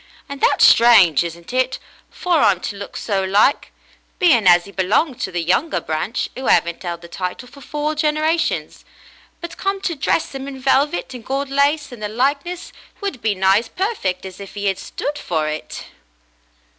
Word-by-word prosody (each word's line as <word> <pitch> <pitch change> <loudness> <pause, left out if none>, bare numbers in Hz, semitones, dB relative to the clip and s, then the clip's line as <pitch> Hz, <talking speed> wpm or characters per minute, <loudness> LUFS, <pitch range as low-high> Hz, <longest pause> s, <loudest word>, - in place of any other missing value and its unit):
And 280 0 -8
that's - - +5
strange, 210 - +6
isn't 170 +5 -8
it, 255 0 +1 0.3
for 350 -3 0
'im 185 - -3
to 205 - -4
look 200 0 -8
so 195 -3 -1
like, 200 +8 +2 0.5
being 270 - +4
as 175 +1 +6
'e - - -11
belonged 210 - 0
to 190 - -2
the 175 -1 -2
younger 190 - +1
branch 160 +10 -2
who 260 - -5
'aven't 170 +2 +2
'eld 170 -1 -5
the - - -9
title 180 +7 -5
for 280 +3 -15
four 300 +2 -3
generations; 310 +2 -1 0.6
but 340 - -7
come 390 0 -1
to 350 - -1
dress 310 +1 -1
'im 270 0 -6
in 270 -1 -7
velvet 265 -5 +1
and 245 -2 -9
gold 275 +2 -3
lace, 285 +1 +1
and 240 -3 -10
the 210 - -3
likeness 280 +10 -2 0.3
would 395 - -4
be 215 -2 0
nigh 190 +2 +4
as 230 - -9
perfect 360 - -2
as 185 0 -9
if 200 +1 -10
'e 200 0 -2
'ad 195 -1 0
stood 290 +7 -5
for 155 -3 -2
it." 155 0 -5
245 Hz, 185 wpm, -20 LUFS, 190-290 Hz, 0.6 s, strange